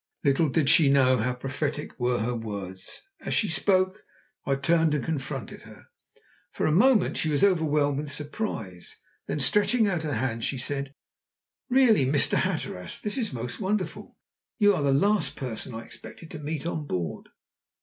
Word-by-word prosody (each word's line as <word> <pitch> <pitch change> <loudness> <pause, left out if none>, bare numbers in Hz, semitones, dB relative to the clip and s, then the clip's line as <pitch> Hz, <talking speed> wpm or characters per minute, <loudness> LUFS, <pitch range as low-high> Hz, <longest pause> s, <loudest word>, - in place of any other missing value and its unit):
Little 145 +2 +3
did 150 0 +1
she 145 0 +6
know 130 -2 +4
how 125 +3 0
prophetic 140 +4 -4
were 120 -1 +1
her 120 +3 -1
words. 100 -5 -6 0.2
As - - -2
she 210 - +2
spoke 185 +4 +1 0.4
I 135 - +2
turned 160 +2 +2
and 140 - -2
confronted 135 -6 -4
her. - - -15 0.6
For - - -2
a - - +2
moment 220 +4 +4
she 160 - 0
was 145 +2 +1
overwhelmed 150 -7 +2
with 150 -1 -4
surprise, 145 - -5 0.3
then, - - -2
stretching 210 - +3
out 180 -5 0
her 150 -4 -2
hand, 115 -1 -2
she 135 - -1
said: 140 +2 -4 0.7
"Really, 245 - +4
Mr. 145 +1 +3
Hatteras, 90 -1 -3
this 210 - -3
is 240 -5 -1
most 120 -1 -5
wonderful. 200 -1 -3 0.4
You 205 -3 +5
are - - -1
the 140 -1 +2
last 165 +2 +2
person 125 -1 -5
I 115 - -6
expected 115 +8 -12
to 155 - -7
meet 150 0 -4
on 160 -3 -3
board." 90 - -4
145 Hz, 170 wpm, -26 LUFS, 130-170 Hz, 0.7 s, she